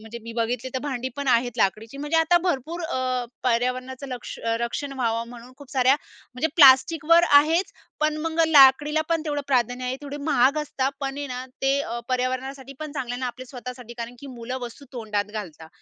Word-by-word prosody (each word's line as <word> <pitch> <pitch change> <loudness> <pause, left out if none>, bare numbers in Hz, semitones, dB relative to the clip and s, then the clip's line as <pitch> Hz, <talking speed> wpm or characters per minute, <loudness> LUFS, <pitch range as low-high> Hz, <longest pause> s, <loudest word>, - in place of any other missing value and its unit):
म्हणजे 220 +2 -9
मी 230 +1 -8
बघितली 240 +2 -2
तर 260 - +1
भांडी 260 -3 -3
पण 280 -1 -3
आहेत 245 -1 +2
लाकडीची 220 +4 0
म्हणजे 295 +3 -1
आता 325 +2 +4
भरपूर 335 0 -2
अ, 255 -5 -1 0.2
पर्यावरणाचं 255 +2 -1
लक्ष 250 -2 -7 0.2
रक्षण 275 +4 -3
व्हावं 230 -3 -1
म्हणून 245 +1 -12
खूप 280 -2 -14
साऱ्या 260 0 +4 0.4
म्हणजे 255 +6 0
प्लास्टिकवर 315 +3 +6 0.2
आहेच, 325 +6 +1 0.3
पण 305 0 +1
मग 325 0 -1
लाकडीला 295 0 +6
पण 330 -2 +1
तेवढं 290 -2 -1
प्राधान्य 250 -2 0
आहे, 250 +1 -2
तेवढे 285 0 -6
महाग 270 +3 +3
असतात 275 -2 -2
पण 270 -1 -3
आहे 290 - -3
ना 250 0 -5 0.2
ते 270 +1 +3
अ, 235 -4 -4
पर्यावरणासाठी 260 +1 -2
पण 305 -1 -6
चांगलं 250 -4 -4
आहे 245 - -6
ना, 255 - -1
आपल्या 255 +1 -7
स्वतःसाठी 250 -1 -9
कारण 235 +1 -5
की 280 - -9
मुलं 245 +2 -5
वस्तू 240 +4 -8
तोंडात 215 -4 -2
घालतात 165 -7 -7
260 Hz, 190 wpm, -24 LUFS, 245-285 Hz, 0.4 s, प्लास्टिकवर